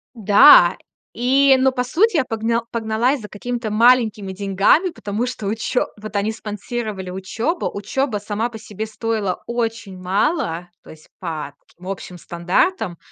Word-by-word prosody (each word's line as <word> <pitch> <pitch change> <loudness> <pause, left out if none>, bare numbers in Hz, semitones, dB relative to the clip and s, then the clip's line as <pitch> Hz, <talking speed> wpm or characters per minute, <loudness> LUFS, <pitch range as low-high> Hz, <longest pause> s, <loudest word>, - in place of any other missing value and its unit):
Да, 215 +6 +7 0.4
и 270 +3 +4
но, 265 0 +3
по 250 -1 -1
сути, 355 - +2
я 280 - +3
погна 230 +1 -1
погналась 230 +3 0
за 210 - -8
какими-то 235 +1 -4
маленькими 220 -4 +3
деньгами, 200 - +2
потому 215 -5 -3
что 225 -5 -5
учё 225 +4 -1
вот 215 -1 -8
они 205 +2 0
спонсировали 210 -2 -5
учёбу. 225 - -3
Учёба 215 +3 -2
сама 210 +3 -3
по 225 - -9
себе 215 0 -6
стоила 220 -3 -3
очень 225 -5 -3
мало, 185 - -1
то - - -16
есть 155 0 -15
по 155 -5 -5
таким 180 +2 -15
общим 185 -2 -6
стандартам. 175 - -1
220 Hz, 145 wpm, -20 LUFS, 195-245 Hz, 0.4 s, Да